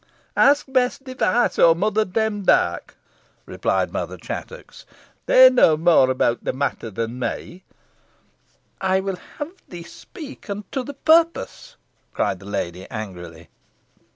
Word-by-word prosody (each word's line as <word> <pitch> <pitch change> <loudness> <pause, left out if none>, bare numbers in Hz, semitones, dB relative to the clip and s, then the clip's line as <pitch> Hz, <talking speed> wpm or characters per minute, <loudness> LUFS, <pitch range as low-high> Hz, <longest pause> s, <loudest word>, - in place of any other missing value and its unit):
"Ask 285 +1 +4
Bess 255 -2 +1
Device, 255 -4 -1
or 165 -1 +6
Mother 215 +4 0
Demdike," 210 0 0 0.5
replied - - -1
Mother - - -4
Chattox; - - -9 0.4
"they 260 0 +8
know 245 -12 +4
more 160 -5 +4
about 130 -2 0
the - - -1
matter 135 -4 -3
than 115 +4 -5
me." 175 +8 -5 1.2
"I 190 0 +2
will 190 -1 -4 0.2
have 295 +2 -5 0.2
thee 175 -1 -8
speak, 275 - -12
and 200 +1 -4
to 270 - -2
the 280 +3 -8
purpose," 330 +4 +1 0.4
cried 95 - -1
the 95 - -13
lady, 90 -2 -5
angrily. 90 -6 -8
190 Hz, 125 wpm, -22 LUFS, -, 1.2 s, they